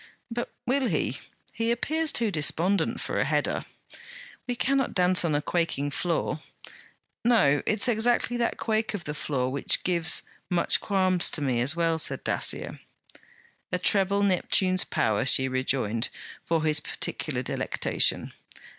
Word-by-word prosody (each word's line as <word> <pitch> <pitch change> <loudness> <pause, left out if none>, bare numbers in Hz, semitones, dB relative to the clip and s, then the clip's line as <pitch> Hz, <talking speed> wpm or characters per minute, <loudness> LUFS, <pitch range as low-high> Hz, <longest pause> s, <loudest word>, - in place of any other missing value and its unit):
'But 240 +1 -4
will 260 +1 +1
he? 150 - -1 0.3
He 230 +1 -2
appears 310 +6 0
too 225 -3 +1
despondent 170 +4 +1
for - - -3
a - - +3
header.' - - -1 0.9
'We 245 - -2
cannot 270 +2 0
dance 180 -1 +4
on 160 -3 0
a 145 - -1
quaking 160 -5 -1
floor.' 165 0 -1 0.8
'No; 205 -12 +3
it 215 - +1
's - - +5
exactly 240 +1 +1
that 235 -1 -1
quake 220 -1 -1
of 190 - -6
the 150 - -5
floor 130 -4 -2
which 140 - +1
gives 170 -2 +3 0.3
"much 175 -1 +1
qualms," 185 -3 +2
to 155 - -3
me 130 -4 0
as 140 +6 +1
well,' 165 -1 0
said - - 0
Dacier. - - -2 0.9
'A 180 - +1
treble 200 +2 +2
Neptune's 185 -1 +2
power!' 110 -2 0
she 130 0 +5
rejoined, 130 -3 -1 0.4
for 165 -2 +1
his 155 -1 +2
particular - - -3
delectation. - - -1
180 Hz, 145 wpm, -26 LUFS, 150-220 Hz, 0.9 s, s